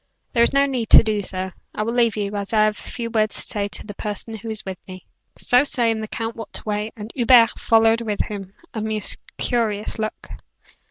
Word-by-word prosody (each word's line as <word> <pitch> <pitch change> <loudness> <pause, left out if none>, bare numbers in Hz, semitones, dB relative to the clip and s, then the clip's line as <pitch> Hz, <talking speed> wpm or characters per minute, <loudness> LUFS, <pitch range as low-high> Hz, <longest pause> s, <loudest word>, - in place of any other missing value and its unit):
"There 235 - +3
is 235 - +4
no 275 0 +4
need 255 -5 -2
to - - +9
do 215 -2 0
so. 185 -1 -3 0.2
I 215 - -1
will 230 +2 -2
leave 235 -3 +2
you, 205 -1 -2
as 200 +1 -3
I 215 -1 +5
have 215 0 +2
a - - -9
few 230 -2 -4
words 215 -2 +1
to - - +1
say 205 -1 -1
to - - -3
the 205 - -7
person 210 +2 -5
who 220 +1 -7
is 220 -1 -2
with 190 -2 -6
me." 185 -1 -10 0.3
So 250 +2 +4
saying 230 -5 +1
the 215 - -5
count 225 +1 -4
walked 225 -2 -8
away, 210 0 -3
and 215 +1 -7
Hubert 240 -2 +5
followed 225 0 +4
him 230 - -6 0.3
with 190 -1 -12 0.2
a 220 - -3
most 215 -1 -2 0.2
curious 220 -4 -1
look. 215 0 -4
220 Hz, 225 wpm, -22 LUFS, 210-230 Hz, 0.3 s, to